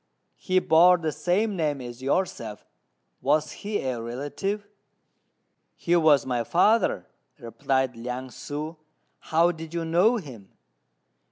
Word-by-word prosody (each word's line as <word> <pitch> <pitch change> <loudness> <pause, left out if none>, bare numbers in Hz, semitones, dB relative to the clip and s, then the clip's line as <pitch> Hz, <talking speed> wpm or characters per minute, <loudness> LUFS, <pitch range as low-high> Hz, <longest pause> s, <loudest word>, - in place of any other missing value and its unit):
He 185 -1 -1
bore 180 +1 +6
the 160 -2 -2
same 200 +7 0
name 150 -5 -1
as 120 0 -9
yourself; 130 - -2 0.6
was 150 +1 +1
he 205 0 -4
a 125 -3 -2
relative?" 145 - -4 1.1
"He 175 - 0
was 155 -4 +4
my 125 -2 -1
father," 195 - +2 0.3
replied 130 +1 -1
Liang 125 +2 -5
ssŭ; 150 +5 -6 0.4
"how 165 +2 +2
did 165 0 -9
you 165 -1 -2
know 180 +9 +3
him?" 125 - -10
155 Hz, 120 wpm, -26 LUFS, 130-180 Hz, 1.1 s, bore